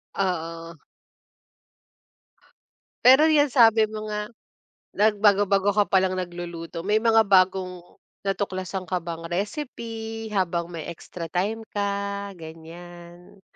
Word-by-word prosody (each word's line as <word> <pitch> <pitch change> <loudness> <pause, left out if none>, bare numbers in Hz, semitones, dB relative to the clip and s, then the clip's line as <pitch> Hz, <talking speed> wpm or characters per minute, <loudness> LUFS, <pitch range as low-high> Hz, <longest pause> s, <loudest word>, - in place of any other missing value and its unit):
Oo. 165 -3 -3 2.3
Pero 265 +5 +8
'yan 295 -2 +4
sabi 225 -3 +6
mo 215 0 -7
nga, 210 0 -3 0.7
nagbago-bago 205 -1 +3
ka 205 - +5
palang 190 -1 +2
nagluluto, 175 -2 -6
may 210 +2 +2
mga 225 -1 +4
bagong 185 -1 +2 0.5
natuklasan 190 -1 -3
ka 185 - -1
bang 165 -1 -6
recipe 225 - -5
habang 175 -3 -1
may 165 -2 -7
extra 170 +1 -8
time 205 +7 -1
ka 200 0 -2
ganiyan? 175 +3 -12
195 Hz, 100 wpm, -24 LUFS, 175-215 Hz, 2.3 s, Pero